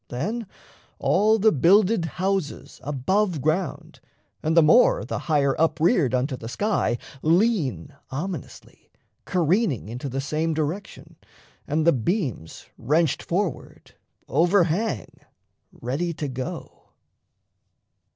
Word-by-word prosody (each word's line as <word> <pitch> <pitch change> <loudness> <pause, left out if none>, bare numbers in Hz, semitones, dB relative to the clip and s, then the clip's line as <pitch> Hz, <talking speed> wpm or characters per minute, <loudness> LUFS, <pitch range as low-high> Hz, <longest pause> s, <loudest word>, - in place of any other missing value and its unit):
Then 205 - -3 0.5
all 215 +4 +3
the 220 +1 +4
builded 185 - +4
houses 190 -4 -2
Above 170 +6 0
ground 155 +7 -2 0.4
and 160 +2 0
the 165 - +8
more, 250 - +5
the - - -3
higher 140 -3 +2
up 160 -1 +2
reared 160 - +3
Unto 130 +2 -1
the 115 -2 -8
sky 205 - 0 0.2
lean 165 - +1 0.2
ominously, 165 +2 -7 0.4
careening 175 - +1
Into 125 +4 -5
the 135 +2 -3
same 155 +3 -1
direction; 160 +6 -5 0.5
and 155 +2 0
the 170 - +5
beams, 130 - -3
Wrenched 150 +5 +1
forward, 180 -3 -4 0.3
over 175 +6 +3
hang, 165 - -2 0.5
ready 145 +8 -3
to 150 - -3
go. 130 -1 -7
160 Hz, 110 wpm, -24 LUFS, 135-195 Hz, 0.5 s, the